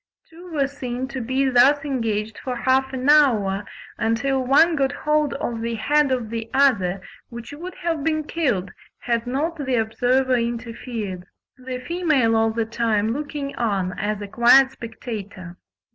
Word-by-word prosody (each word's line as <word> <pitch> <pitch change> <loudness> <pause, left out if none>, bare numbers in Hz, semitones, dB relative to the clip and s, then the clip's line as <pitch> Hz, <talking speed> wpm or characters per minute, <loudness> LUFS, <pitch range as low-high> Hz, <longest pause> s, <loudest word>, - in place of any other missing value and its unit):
Two 350 +2 -13
were 290 -3 +1
seen 260 -2 -5
to 265 -2 -5
be 260 +3 0
thus 265 +3 +4
engaged 225 -5 -2
for 255 -1 -4
half 260 +2 +1
an 260 0 -3
hour, 220 -10 +4 0.4
until 260 +4 0
one 320 +6 +4
got 270 -2 +1
hold 300 0 0
of 235 -4 -3
the 230 0 -2
head 285 +6 +2
of 240 -4 -2
the 230 -1 -4
other, 200 -10 +2 0.3
which 235 +2 -9
would 350 +5 -8
have 330 -4 -2
been 310 0 0
killed 255 - -1 0.3
had 235 0 -1
not 295 +5 -2
the 260 -2 0
observer 245 +3 +1
interfered; 230 -5 -4 0.3
the 255 -1 -6
female 280 -5 +1
all 225 0 +3
the 225 0 -1
time 225 -1 0
looking 285 0 -5
on 195 -6 -1
as 210 0 -2
a - - -6
quiet 250 +5 +5
spectator. 205 -7 -8
250 Hz, 160 wpm, -22 LUFS, 225-280 Hz, 0.4 s, quiet